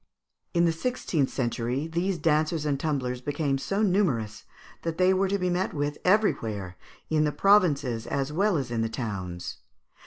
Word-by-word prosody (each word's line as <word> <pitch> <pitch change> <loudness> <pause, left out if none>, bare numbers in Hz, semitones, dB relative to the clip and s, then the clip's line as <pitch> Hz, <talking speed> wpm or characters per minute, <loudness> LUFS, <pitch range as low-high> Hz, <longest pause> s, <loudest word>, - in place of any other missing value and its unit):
In 170 0 +4
the 165 - +3
sixteenth 165 - -1
century 125 +2 -2
these 170 +3 -1
dancers 155 -1 +1
and 140 -2 0
tumblers 130 -5 -2
became 145 0 -1
so 200 +9 -1
numerous 135 - 0 0.4
that 165 -1 -3
they 185 +1 +4
were 190 +1 +2
to 200 +1 0
be 180 -2 0
met 180 0 -1
with 145 0 -2
everywhere, 110 - +1 0.4
in 155 -1 +3
the 150 - +1
provinces 145 - +3
as 140 +1 -2
well 195 +2 +2
as 130 -4 -3
in 115 -1 0
the 115 - 0
towns. 95 -7 -5
150 Hz, 165 wpm, -27 LUFS, 125-180 Hz, 0.4 s, In